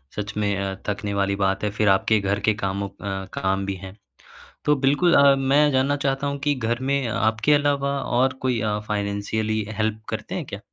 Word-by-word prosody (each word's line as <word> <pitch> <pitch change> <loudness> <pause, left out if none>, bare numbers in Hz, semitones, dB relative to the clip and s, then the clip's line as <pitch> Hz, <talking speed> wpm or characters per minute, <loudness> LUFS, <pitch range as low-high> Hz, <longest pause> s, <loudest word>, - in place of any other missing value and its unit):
सच 105 0 -4
में 100 -1 +1
अ, 95 0 -3
थकने 100 0 -3
वाली 100 0 0
बात 95 +1 0
है 105 - +1
फिर 105 0 +1
आपके 100 +3 +3
घर 100 +1 -1
के - - +3
कामों 100 +1 -2
अ 95 -1 -5
काम 95 +1 -1
भी 100 0 -3
हैं। 95 +2 -11 0.7
तो 150 - +4
बिल्कुल, 155 +6 +3
अ, 140 -1 +7
मैं 140 +2 +3
जानना 135 +2 +2
चाहता 135 +1 0
हूँ 140 0 -2
कि 145 0 +1
घर 120 -1 -1
में 140 -3 +1
आपके 110 +5 +1
अलावा 140 -1 +1 0.2
और 130 0 +3
कोई 125 -3 +1
अ, 105 -1 -1
फ़ाइनेंशियली 105 +1 -1
हेल्प 110 0 -1
करते 110 - -4
हैं 175 -5 -3
क्या? 100 - -7
110 Hz, 200 wpm, -23 LUFS, 100-140 Hz, 0.7 s, अ